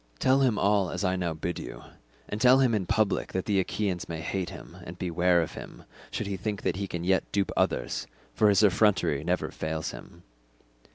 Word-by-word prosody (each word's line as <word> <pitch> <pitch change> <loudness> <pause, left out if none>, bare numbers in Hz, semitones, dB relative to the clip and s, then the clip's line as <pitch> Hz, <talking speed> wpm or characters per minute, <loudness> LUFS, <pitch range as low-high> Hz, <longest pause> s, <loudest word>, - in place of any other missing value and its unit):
Tell 130 - +3
him 125 -6 +2
all 100 -2 +2
as 90 +2 -3
I 95 -1 +1
now 85 -3 -2
bid 85 +3 -3
you, - - -8 0.4
and 105 - -5
tell 125 +2 +7
him 130 -3 +3
in 100 -5 0
public 105 +2 0
that 95 - -1
the 100 -2 +2
Achaeans 95 -1 -2
may 80 -1 -4
hate 90 +3 -3
him - - -11
and - - -9
beware 90 0 +2
of 80 - -6
him - - -10 0.3
should - - -3
he 100 -1 -3
think 105 +1 -4
that - - 0
he 100 0 -3
can 85 -2 -4
yet 95 +1 +1
dupe 100 -1 0
others - - 0 0.3
for 105 -1 +4
his 100 +1 +4
effrontery 90 -7 +3
never 90 +1 -1
fails 80 0 -3
him. 85 +8 -12
95 Hz, 210 wpm, -28 LUFS, 85-105 Hz, 0.4 s, tell